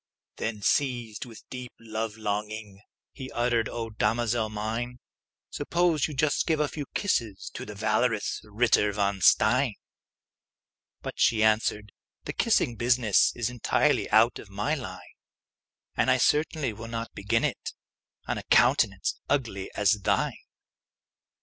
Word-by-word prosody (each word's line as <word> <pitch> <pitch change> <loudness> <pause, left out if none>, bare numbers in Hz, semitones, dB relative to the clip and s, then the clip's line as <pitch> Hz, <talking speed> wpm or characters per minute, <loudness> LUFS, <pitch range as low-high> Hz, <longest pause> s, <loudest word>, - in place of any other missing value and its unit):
Then, 105 -3 -4
seized 120 -5 0
with 115 -3 -12
a - - -39
deep 125 -1 -7
love 110 -1 -4
longing, 105 -1 -4 0.3
He 130 -2 -8
uttered, 120 -2 +1
"O 115 -1 -5
damosel 115 +1 0
mine, 110 +4 -3 0.5
Suppose 165 0 +1
you 150 - -7
just 145 +2 +1
give 160 -2 +2
a 150 - +2
few 145 -1 -6
kisses 115 - -1
To - - -7
the 105 - -8
valorous 110 +1 0
Ritter 105 -1 +2
von 100 -1 0
Stein!" 115 +5 +4 1.3
But - - -6
she 110 -2 +4
answered, 110 -1 +1 0.3
"The - - -5
kissing 120 - +1
business 120 -3 +3
Is 120 0 -1
entirely 125 -2 +1
out 110 +3 +4
of 100 - -12
my 105 +9 -1
line; 95 - -7 0.8
And - - +2
I 130 - +5
certainly 150 -2 +1
will 115 +2 -8
not 115 0 -5
begin 110 +3 0
it - - -2 0.5
On - - -2
a - - -9
countenance - - +3
ugly 115 -9 -1
as 100 -2 +3
thine!" - - 0
115 Hz, 140 wpm, -27 LUFS, 105-125 Hz, 1.3 s, I